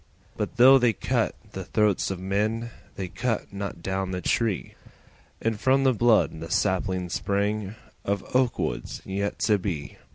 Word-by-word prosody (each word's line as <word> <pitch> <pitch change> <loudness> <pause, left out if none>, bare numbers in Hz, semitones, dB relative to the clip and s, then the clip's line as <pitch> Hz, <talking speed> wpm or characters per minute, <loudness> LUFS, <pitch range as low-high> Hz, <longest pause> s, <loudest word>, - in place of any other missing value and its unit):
But - - -3
though 130 +2 +8
they 120 -2 +3
cut - - 0 0.2
the - - -5
throats 105 -3 +1
of 95 -2 -4
men 105 +5 -1 0.2
They 95 - -4
cut 115 +2 -2
not 100 -4 -5
down 95 +1 -2
the 90 -1 -2
tree, 110 +1 0 0.7
And 110 -2 -1
from 135 +3 +3
the 130 -1 +4
blood 110 -8 +3
the 80 +1 -7
saplings 95 -1 0
sprang 100 +1 -1 0.3
Of 100 -1 -1
oak 130 -2 +3
woods - - -3
yet 100 +1 -2
to 105 -2 +3
be. 85 -7 -4
100 Hz, 160 wpm, -26 LUFS, 95-115 Hz, 0.7 s, though